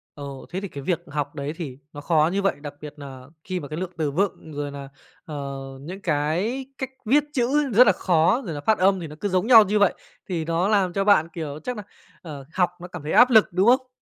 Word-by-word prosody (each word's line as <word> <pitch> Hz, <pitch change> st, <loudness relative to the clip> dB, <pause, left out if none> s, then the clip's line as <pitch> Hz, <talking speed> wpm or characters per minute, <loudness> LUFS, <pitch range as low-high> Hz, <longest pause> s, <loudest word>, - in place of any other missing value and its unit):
Ồ, 140 Hz, -2 st, -8 dB
thế 185 Hz, +2 st, -4 dB
thì 200 Hz, -, -4 dB
cái 140 Hz, -6 st, -8 dB
việc 170 Hz, +2 st, -1 dB
học 145 Hz, 0 st, -4 dB
đấy 145 Hz, 0 st, -4 dB
thì 145 Hz, -7 st, -6 dB, 0.2 s
nó 145 Hz, -, -8 dB
khó 155 Hz, 0 st, +3 dB
như 200 Hz, -, 0 dB
vậy, 195 Hz, -, +1 dB
đặc 145 Hz, -1 st, -7 dB
biệt 150 Hz, -1 st, -8 dB
nà 135 Hz, -3 st, -10 dB, 0.2 s
khi 185 Hz, -1 st, -3 dB
mà 145 Hz, -, -7 dB
cái 150 Hz, -, -6 dB
lượng 185 Hz, -1 st, -4 dB
từ 155 Hz, -3 st, -1 dB
vựng, 175 Hz, -1 st, -2 dB
rồi 145 Hz, 0 st, -4 dB
nà, 140 Hz, -1 st, -8 dB, 0.4 s
ờ, 140 Hz, -3 st, -5 dB, 0.3 s
những 180 Hz, +7 st, -8 dB
cái 175 Hz, -, -1 dB
cách 265 Hz, -, -4 dB, 0.2 s
viết 280 Hz, +7 st, +4 dB
chữ 275 Hz, +2 st, +1 dB
rất 240 Hz, +4 st, +7 dB
là 205 Hz, -, +6 dB
khó, 175 Hz, +7 st, +2 dB
rồi 170 Hz, -, -4 dB
là 145 Hz, -, -5 dB
phát 220 Hz, +7 st, +2 dB
âm 195 Hz, +1 st, +3 dB
thì 170 Hz, -, -6 dB
nó 150 Hz, -, -10 dB
cứ 205 Hz, -, -2 dB
giống 185 Hz, +3 st, 0 dB
nhau 230 Hz, -3 st, +9 dB
như 210 Hz, +1 st, 0 dB
vậy, 200 Hz, -2 st, +4 dB, 0.4 s
thì 165 Hz, -3 st, -2 dB
nó 165 Hz, +3 st, 0 dB
làm 195 Hz, -4 st, +2 dB
cho 195 Hz, -, 0 dB
bạn, 200 Hz, -6 st, +4 dB
kiểu, 155 Hz, -3 st, -5 dB
chắc 250 Hz, -, -3 dB
nà, 210 Hz, -, -6 dB, 0.4 s
ờ, 145 Hz, -5 st, -9 dB
học 180 Hz, -2 st, +2 dB
nó 180 Hz, -, -7 dB
cảm 180 Hz, -3 st, -9 dB
thấy 150 Hz, -, -4 dB
áp 250 Hz, -, +7 dB
lực, 220 Hz, -4 st, +6 dB
đúng 185 Hz, +4 st, +2 dB
không? 255 Hz, +1 st, +4 dB
175 Hz, 255 wpm, -24 LUFS, 145-205 Hz, 0.4 s, nhau